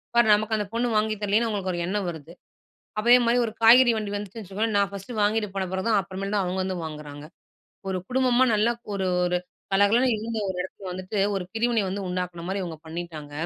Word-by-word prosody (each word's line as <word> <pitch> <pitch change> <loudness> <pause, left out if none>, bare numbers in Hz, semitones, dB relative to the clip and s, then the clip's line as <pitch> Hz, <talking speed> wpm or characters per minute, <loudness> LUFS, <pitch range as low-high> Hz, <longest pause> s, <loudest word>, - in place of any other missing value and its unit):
பாரு 235 -1 +5
நமக்கு 215 +1 +1
அந்தப் 210 -1 -3
பொண்ணு 235 +1 0
வாங்கி 215 0 +1
தரலையேன்னு 210 +3 +2
அவங்களுக்கு 200 -4 -2
ஒரு 175 - -3
எண்ணம் 195 +1 -2
வருது. 160 -1 -9 0.7
அதே 240 +3 +6
மாரி 235 +1 +3
ஒரு 225 - -4
காய்கறி 240 +2 +8
வண்டி 210 -2 -3
வந்துச்சுன்னு 205 +2 -6
வச்சுக்கோங்களேன், 205 +3 -2
நா 200 - +5
ஃபர்ஸ்ட் 200 +4 -8
வாங்கிட்டு 210 0 +1
போனப்பறம்தான், 190 +3 0
அப்பறமேல்தான் 195 +2 -2
அவங்க 180 +1 -2
வந்து 185 -1 -3
வாங்குறாங்க. 150 -2 -8 0.7
ஒரு 185 - -1
குடும்பமா 255 0 +3
நல்லா 215 +3 +3 0.2
ஒரு 190 -1 -1 0.2
ஒரு 180 0 +1 0.4
கலகலன்னு 225 +6 +4
இருந்த 225 +1 -4
ஒரு 190 - -3
இடத்துல 190 0 -8
வந்துட்டு, 185 +3 -5 0.2
ஒரு 190 - -3
பிரிவினை 230 0 +1
வந்து 195 +1 -3
உண்டாக்குன 180 -2 -4
மாரி 195 0 -2
இவங்க 165 -3 -7
பண்ணீட்டாங்க. 160 -3 -7
200 Hz, 185 wpm, -25 LUFS, 185-225 Hz, 0.7 s, காய்கறி